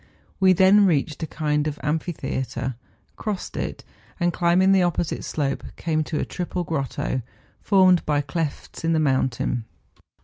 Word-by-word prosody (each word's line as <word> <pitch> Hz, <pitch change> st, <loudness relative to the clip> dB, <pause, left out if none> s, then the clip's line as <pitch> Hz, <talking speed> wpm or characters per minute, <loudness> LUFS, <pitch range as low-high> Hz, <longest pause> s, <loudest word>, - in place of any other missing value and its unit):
We 190 Hz, -1 st, +6 dB
then 195 Hz, +3 st, +6 dB
reached 150 Hz, -2 st, 0 dB
a 160 Hz, -, -2 dB
36 -, -, -18 dB
MOUNTAIN 150 Hz, -1 st, +2 dB
ADVENTURES. 150 Hz, 0 st, -1 dB
kind -, -, -11 dB
of -, -, -1 dB
amphitheatre, 130 Hz, -5 st, -2 dB, 0.4 s
crossed 210 Hz, -4 st, -4 dB
it, -, -, -4 dB, 0.4 s
and, 175 Hz, -1 st, +1 dB
climbing 180 Hz, +2 st, +3 dB
the 195 Hz, -1 st, +5 dB
opposite 175 Hz, -2 st, -1 dB
slope, 140 Hz, -3 st, -2 dB
came 155 Hz, -2 st, 0 dB
to 150 Hz, -, -2 dB
a -, -, -1 dB
triple 180 Hz, 0 st, -3 dB
grotto, 135 Hz, -4 st, -2 dB, 0.4 s
formed 185 Hz, -3 st, +5 dB
by 145 Hz, -1 st, +1 dB
clefts 145 Hz, +2 st, -4 dB
in 165 Hz, 0 st, +2 dB
the 160 Hz, -, +2 dB
mountains. 130 Hz, -4 st, 0 dB
160 Hz, 165 wpm, -24 LUFS, 145-180 Hz, 0.4 s, We